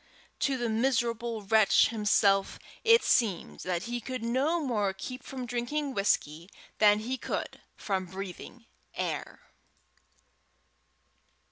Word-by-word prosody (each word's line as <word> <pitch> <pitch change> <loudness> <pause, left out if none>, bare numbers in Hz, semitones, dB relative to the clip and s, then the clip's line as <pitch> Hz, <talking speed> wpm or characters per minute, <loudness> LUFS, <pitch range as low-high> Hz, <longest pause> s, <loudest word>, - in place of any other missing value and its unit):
To 275 -2 +1
the 240 -1 -1
miserable 235 -1 0
wretch 215 0 +4
himself 205 -3 +2 0.3
it 460 +1 +6
seemed 210 -8 +1
that 180 -1 -2
he 240 +2 -4
could 255 0 -5
no 270 +9 +1
more 215 -10 0
keep 255 +6 -7
from 260 -2 -6
drinking 245 +4 -2
whisky 175 -5 0 0.3
than 210 -1 +6
he 255 +3 -3
could - - -4 0.2
from 190 -2 -2
breathing 195 +5 -8 0.3
air. - - -4
230 Hz, 115 wpm, -29 LUFS, 200-255 Hz, 0.3 s, it